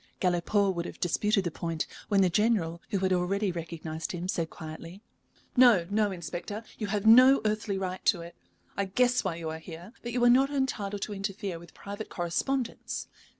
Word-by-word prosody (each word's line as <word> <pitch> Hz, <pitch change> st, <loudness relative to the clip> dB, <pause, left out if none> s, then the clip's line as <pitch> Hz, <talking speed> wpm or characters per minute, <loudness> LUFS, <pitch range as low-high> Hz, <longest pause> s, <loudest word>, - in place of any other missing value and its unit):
Galipaud 190 Hz, +2 st, +2 dB
would 170 Hz, -1 st, -3 dB
have -, -, -10 dB
disputed 205 Hz, +3 st, +1 dB
the 175 Hz, -, -2 dB
point, 165 Hz, 0 st, -3 dB, 0.2 s
when 200 Hz, -2 st, +3 dB
the 185 Hz, -, +4 dB
General, 175 Hz, -5 st, +1 dB
who 200 Hz, -, 0 dB
had 190 Hz, 0 st, +1 dB
already 190 Hz, +3 st, +1 dB
recognized 165 Hz, -1 st, -5 dB
him, 175 Hz, 0 st, -4 dB
said 165 Hz, -3 st, -1 dB
quietly: 165 Hz, +5 st, -9 dB, 0.5 s
"No, 240 Hz, -9 st, +6 dB
no, 210 Hz, 0 st, +2 dB
Inspector, 185 Hz, +4 st, -5 dB, 0.2 s
you 210 Hz, -, -2 dB
have 205 Hz, +1 st, -2 dB
no 255 Hz, +5 st, +8 dB
earthly 210 Hz, -2 st, 0 dB
right 185 Hz, -1 st, -4 dB
to 175 Hz, -, +3 dB
it. 170 Hz, 0 st, -10 dB, 0.4 s
I 200 Hz, -, 0 dB
guess 245 Hz, +6 st, +2 dB
why 190 Hz, -4 st, -1 dB
you 165 Hz, -1 st, -4 dB
are 160 Hz, -, -6 dB
here, 170 Hz, +6 st, -10 dB
but 240 Hz, -, -5 dB
you 245 Hz, 0 st, 0 dB
are -, -, +7 dB
not 265 Hz, +3 st, +5 dB
entitled 210 Hz, -8 st, -2 dB
to 210 Hz, -, -4 dB
interfere 195 Hz, -2 st, -4 dB
with 170 Hz, 0 st, -15 dB
private 205 Hz, +2 st, -7 dB
correspondence. 235 Hz, +9 st, -2 dB
195 Hz, 190 wpm, -29 LUFS, 170-215 Hz, 0.5 s, no